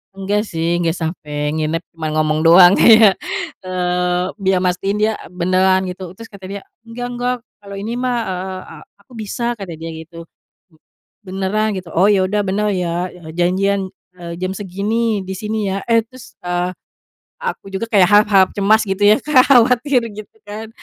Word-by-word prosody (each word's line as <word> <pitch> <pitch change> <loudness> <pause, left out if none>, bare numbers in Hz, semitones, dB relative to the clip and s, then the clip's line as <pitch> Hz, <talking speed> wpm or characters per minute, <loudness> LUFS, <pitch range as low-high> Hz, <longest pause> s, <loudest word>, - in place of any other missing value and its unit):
Enggak, 200 +2 -1
sih, 165 0 0
enggak 170 -1 +1
sampai 150 -2 -3
nginep, 160 +1 -1
cuma 160 -1 -3
ngomong 155 0 +1
doang, 175 +2 +8
kayak, 220 -3 +7 0.5
eee, 180 0 -1 0.2
biar 190 -1 +2
mastiin 185 +2 -1
dia 215 +1 +2 0.3
beneran 185 +1 +2
gitu, 180 -1 -7
terus 230 +5 -12
kata 200 -3 -13
dia, 200 0 -6 0.2
"Enggak, 235 +1 -7
enggak, 245 +1 -1 0.3
kalo 200 0 -10
ini 220 +4 -4
mah, 250 0 -1
eee, 185 0 -6 0.2
aku 200 - -27
bisa," 235 +2 -3
kata 195 -5 -8
dia, 165 - -6 0.2
gitu. 165 0 -12 1.0
"Beneran, 195 +3 -1
gitu?" 180 -2 -12
"Oh, 185 +4 +4
ya 195 -2 +3
udah, 205 +2 0
benar 210 +2 0
ya, 175 0 -2 0.3
janjian 190 +2 +1 0.3
eee, 170 -1 -7
jam 185 0 -1
segini, 205 +2 -1
di - - -5
sini, 210 0 -3
ya." 195 - -2
Eh, 230 -1 +4
terus, 255 +1 -15
ah, 175 0 -1 0.7
aku 480 - -5
juga 210 +4 -3
kayak 195 -5 +5
harap-harap 205 -2 +5
cemas 215 +2 +4
gitu 195 +1 -1
ya 210 +1 +6
Kak, 280 -4 +4
khawatir, 250 +1 +4
gitu 210 +1 -11
kan, 215 +2 -7
195 Hz, 165 wpm, -18 LUFS, 180-215 Hz, 1.0 s, doang